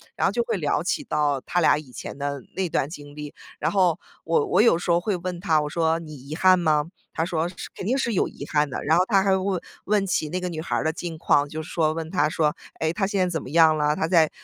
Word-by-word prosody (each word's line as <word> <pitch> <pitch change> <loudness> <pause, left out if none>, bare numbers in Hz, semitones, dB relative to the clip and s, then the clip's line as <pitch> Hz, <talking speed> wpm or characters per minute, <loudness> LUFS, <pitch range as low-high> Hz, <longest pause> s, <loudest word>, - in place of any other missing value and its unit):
然 - - +2
后 - - +1
就 - - 0
会 470 -1 -2
聊 - - 0
起 300 - -1
到 150 - 0
他 175 - -1
俩 155 - +5
以 150 -4 -9
前 - - -8
的 140 -1 -3
那 190 -1 0
段 140 -2 0
经 145 -3 -10
历。 150 -1 -7 0.3
然 155 - 0
后 180 -3 +2 0.2
我 465 - +2
我 375 - +4
有 230 -8 +5
时 175 - -5
候 170 0 +4
会 195 +3 -1
问 180 0 -5
他， 160 -4 +2
我 150 - -3
说： 165 +1 +1
“你 155 -2 -9
遗 140 +3 -8
憾 185 +1 +5
吗？” 155 -4 +2 0.3
他 160 - 0
说： 165 -2 -1
“是 180 - -14 0.2
肯 - - -6
定 250 +6 +1
是 235 -4 0
有 190 - +2
遗 140 - -9
憾 150 -1 +2
的。” - - -5
然 160 - +4
后 180 - +4
他 195 -3 +4
还 195 -1 +3
问 190 -1 -1 0.3
问 205 -1 +2
起 155 -4 0
那 180 +4 -2
个 180 0 -3
女 160 -2 -5
孩 - - -2
儿 - - 0
的 160 - +1
近 165 0 -6
况， 145 -2 +2
就 155 +2 -5
是 - - -11
说 155 -2 +1
问 160 0 -5
她 150 -5 +2
说： 155 0 +1 0.2
“诶， 160 0 +1
她 195 +2 0
现 200 -1 -1
在 185 -1 +2
怎 160 -3 -2
么 - - -9
样 160 +1 +5
了？ 150 0 +2
她 160 - -1
在 165 -3 +4
165 Hz, 305 characters per minute, -24 LUFS, 150-185 Hz, 0.3 s, 俩